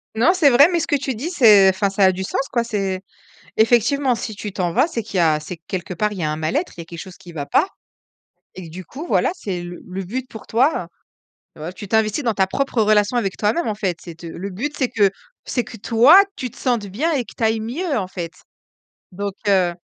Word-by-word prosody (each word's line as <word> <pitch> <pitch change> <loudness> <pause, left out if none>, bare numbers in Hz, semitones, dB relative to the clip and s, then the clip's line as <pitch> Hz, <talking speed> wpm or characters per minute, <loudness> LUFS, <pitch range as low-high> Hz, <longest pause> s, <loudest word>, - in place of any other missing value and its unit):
Non, 245 +11 +4
c'est 340 -6 +5
vrai, 275 +5 +7
mais 345 - +1
ce - - -2
que - - +2
tu 270 -1 -2
dis 255 +9 -4
c'est 215 - +6
enfin 195 +1 +1
ça 195 +1 +1
a 190 - +6
du 190 +1 -4
sens 270 +8 -2
quoi 235 -2 0
c'est 195 -5 -2 0.6
effectivement 240 +4 +3
si 220 -2 -5
tu 210 0 -6
t'en 180 -3 -1
vas, 260 +6 +4
c'est 240 -9 -3
qu'il 205 -3 -5
y - - +3
a 155 -3 +3
c'est 160 +3 -8
que 165 - -52
quelque 180 -1 -4
part 210 +4 0
il 195 - -7
y - - -2
a 155 - 0
un 150 - -1
mal-être, 210 - -2
il 170 - -6
y - - -7
a - - -19
quelque 170 0 -9
chose 185 0 -10
qui 180 -3 -13
va 145 -3 -5
pas - - +3 0.9
et 185 - -8
que, - - -10
du 185 +3 -8
coup, 280 - -8
voilà - - +2
c'est 190 - -4
le 175 0 -8
le 190 +1 -5
but 250 +8 -5
pour 220 - -11
toi 240 - +1 0.7
heu, 160 +4 -6
tu 200 +2 -9
t'investis 220 +5 +1
dans 230 -4 0
ta 190 - +3
propre 245 +3 0
relation 210 +2 +3
avec 195 -5 -1
toi-même 220 +11 0
en 215 - 0
fait. 195 -5 -2
C'est 170 - -9
te 170 +1 -11
c'est 165 - -7
le 195 +3 -6
but 265 +11 -4
c'est 260 -3 0
que 205 -2 +3 0.3
c'est 245 - -1
que 230 - -11
toi 240 - +6
tu 250 -2 -5
te - - -18
sentes 240 -5 0
bien 240 - -1
et 275 - +1
que - - -13
tu - - -4
ailles 220 0 +2
mieux 280 +7 -2
en 190 - -2
fait, 175 -2 -6 0.8
donc, 200 +2 -3 0.2
heu. 185 -3 +3
210 Hz, 265 wpm, -21 LUFS, 185-250 Hz, 0.9 s, vrai